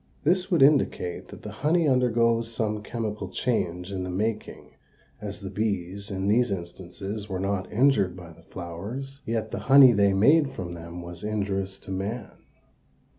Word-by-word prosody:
This 180 Hz, +4 st, +2 dB
would 170 Hz, -7 st, +4 dB
indicate 135 Hz, -, +2 dB
that -, -, -12 dB
the 105 Hz, -, -6 dB
honey 160 Hz, +2 st, +3 dB
undergoes 115 Hz, -3 st, +2 dB
some 110 Hz, -2 st, -2 dB
chemical 105 Hz, -3 st, -4 dB
change 90 Hz, -4 st, -2 dB
in 95 Hz, -2 st, -3 dB
the 90 Hz, -, -4 dB
making, 105 Hz, +4 st, -3 dB, 0.5 s
as -, -, -6 dB
the -, -, -5 dB
bees, 100 Hz, -2 st, -2 dB
in 95 Hz, -1 st, -2 dB
these 120 Hz, +4 st, +3 dB
instances, 95 Hz, +3 st, -6 dB
were 95 Hz, -1 st, -3 dB
not 95 Hz, -1 st, -2 dB
injured 105 Hz, -7 st, +3 dB
by 85 Hz, -2 st, -10 dB
the -, -, -18 dB
flowers, 115 Hz, +12 st, -6 dB
yet 110 Hz, -1 st, -2 dB
the -, -, -3 dB
honey 135 Hz, -2 st, +9 dB
they 100 Hz, -3 st, +3 dB
made 140 Hz, +8 st, +4 dB
from 85 Hz, -6 st, -5 dB
them 85 Hz, +1 st, -8 dB
was 85 Hz, +1 st, -8 dB
injurious 100 Hz, -2 st, -2 dB
to -, -, -9 dB
man. 100 Hz, +4 st, -4 dB
105 Hz, 165 wpm, -26 LUFS, 95-120 Hz, 0.5 s, honey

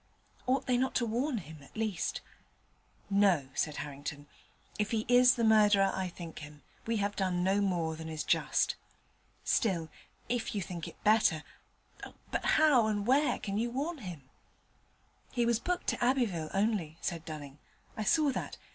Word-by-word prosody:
Ought 260 Hz, +2 st, +1 dB
they 250 Hz, -1 st, +2 dB
not 260 Hz, +1 st, 0 dB
to 240 Hz, -, +2 dB
warn 245 Hz, +4 st, -1 dB
him, 160 Hz, -5 st, -9 dB
at 140 Hz, -, -15 dB
least? 215 Hz, -4 st, -2 dB, 0.9 s
'No,' 190 Hz, -9 st, +3 dB
said 150 Hz, -2 st, -1 dB
Harrington; 145 Hz, 0 st, -7 dB, 0.5 s
'if 210 Hz, 0 st, +1 dB
he 220 Hz, -1 st, -1 dB
is 245 Hz, +1 st, +6 dB
the 235 Hz, -, -1 dB
murderer 210 Hz, -3 st, +5 dB
I 190 Hz, -1 st, -2 dB
think 170 Hz, -2 st, -8 dB
him, 150 Hz, -1 st, -11 dB, 0.2 s
we 230 Hz, 0 st, +1 dB
have 205 Hz, 0 st, -1 dB
done 180 Hz, -2 st, 0 dB
no 195 Hz, +2 st, +2 dB
more 170 Hz, -5 st, 0 dB
than 160 Hz, 0 st, -7 dB
is 155 Hz, -1 st, -3 dB
just. -, -, +1 dB, 0.7 s
Still, 175 Hz, -8 st, +1 dB, 0.4 s
if 235 Hz, -3 st, -2 dB
you 200 Hz, -, 0 dB
think 170 Hz, -2 st, -6 dB
it -, -, -13 dB
better 210 Hz, -8 st, +4 dB, 0.9 s
but -, -, -1 dB
how 290 Hz, -8 st, +5 dB
and 205 Hz, -2 st, -1 dB
where 275 Hz, +5 st, +3 dB
can 200 Hz, +1 st, -3 dB
you 235 Hz, +1 st, 0 dB
warn 290 Hz, +6 st, -3 dB
him?' 175 Hz, -, -8 dB, 1.1 s
'He 240 Hz, -2 st, +1 dB
was 235 Hz, -1 st, +2 dB
booked 360 Hz, +7 st, -2 dB
to -, -, -1 dB
Abbeville 230 Hz, -, +1 dB
only,' 195 Hz, -6 st, 0 dB
said 170 Hz, -3 st, -3 dB
Dunning. 145 Hz, -3 st, -8 dB, 0.4 s
'I 215 Hz, -, -3 dB
saw 300 Hz, +5 st, +3 dB
that. -, -, -5 dB
205 Hz, 165 wpm, -31 LUFS, 165-235 Hz, 1.1 s, is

